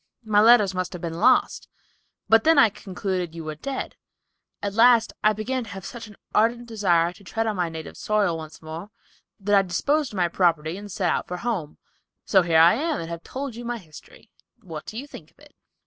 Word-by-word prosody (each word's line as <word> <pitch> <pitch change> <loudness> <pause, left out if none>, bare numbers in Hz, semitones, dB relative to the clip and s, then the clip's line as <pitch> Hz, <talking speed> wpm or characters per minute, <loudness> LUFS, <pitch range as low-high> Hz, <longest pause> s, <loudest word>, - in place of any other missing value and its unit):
My 210 -2 +3
letters 215 -4 +6
must 185 0 -3
have 180 - -7
been 165 0 -4
lost, 255 - +3 0.6
but 225 0 +5
I 325 - +6
then 255 -7 +6
concluded 185 -4 -4
you 165 - -6
were 155 0 -5
dead. 265 - -5 0.7
At 200 -1 -2
last 230 0 +5
I 215 - +5
began 240 +5 -3
to - - -11
have 195 0 -8
such 235 -2 -8
an 210 - -14 0.2
ardent 235 +3 +2
desire 180 -7 +1
to 200 - -18
tread 225 +4 -2
my 175 -2 -1
native 160 -1 -8
soil 205 -5 0
once 160 0 -9
more 160 +5 -7 0.5
that 205 +1 -1
I 200 - +6
disposed 270 - -1
of - - -6
my 175 -1 +2
property 165 -2 +1
and 205 +1 -9
set 180 -1 0
out - - -2
for 180 - -4
home, 180 -8 -3 0.5
so 190 - +4
here 170 -2 +2
I 165 +2 +7
am 305 +5 -1
and 165 - -6
have 170 0 -6
told 270 +4 -6
you 240 - -8
my 240 0 -3
history; 185 +3 -15 0.3
what 160 -5 -8
do 220 - -7
you 265 - -5
think 165 - -12
of - - -35
it?" 295 0 -19
200 Hz, 215 wpm, -24 LUFS, 170-230 Hz, 0.7 s, I